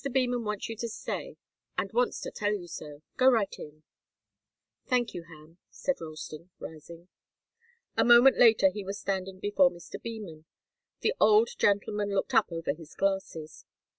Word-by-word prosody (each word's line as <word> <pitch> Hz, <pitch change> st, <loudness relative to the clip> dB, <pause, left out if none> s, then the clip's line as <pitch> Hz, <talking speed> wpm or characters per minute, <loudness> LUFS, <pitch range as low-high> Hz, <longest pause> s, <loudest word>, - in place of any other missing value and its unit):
Beman 245 Hz, -2 st, +1 dB
wants 210 Hz, -2 st, -3 dB
you 225 Hz, -, -5 dB
to 235 Hz, +1 st, -3 dB
stay, -, -, -5 dB, 0.4 s
and -, -, -2 dB
wants -, -, +1 dB
to -, -, -5 dB
tell 205 Hz, 0 st, -1 dB
you 195 Hz, -4 st, -4 dB
so. 150 Hz, -2 st, -9 dB
Go 260 Hz, 0 st, +6 dB
right 225 Hz, -6 st, +2 dB
in." 155 Hz, +1 st, -11 dB, 1.0 s
"Thank 245 Hz, -3 st, +1 dB
you, 170 Hz, -, -7 dB
Ham," 165 Hz, +1 st, -16 dB
said 275 Hz, -8 st, -2 dB
Ralston, 155 Hz, +1 st, -8 dB
rising. 165 Hz, +2 st, -11 dB, 0.9 s
A -, -, +3 dB
moment 240 Hz, +2 st, +7 dB
later 240 Hz, +5 st, +6 dB
he 210 Hz, -4 st, -6 dB
was 195 Hz, +1 st, -5 dB
standing 190 Hz, -1 st, -3 dB
before 195 Hz, -2 st, +4 dB
Mr. 175 Hz, -1 st, -10 dB
Beman. 205 Hz, -9 st, -8 dB, 0.6 s
The 450 Hz, -, +2 dB
old 435 Hz, +2 st, +5 dB
gentleman 205 Hz, -, +1 dB
looked 195 Hz, -, -1 dB
up -, -, +4 dB
over 165 Hz, -3 st, -2 dB
his 155 Hz, 0 st, -14 dB
glasses. 190 Hz, -5 st, -2 dB
195 Hz, 160 wpm, -29 LUFS, 165-235 Hz, 1.0 s, moment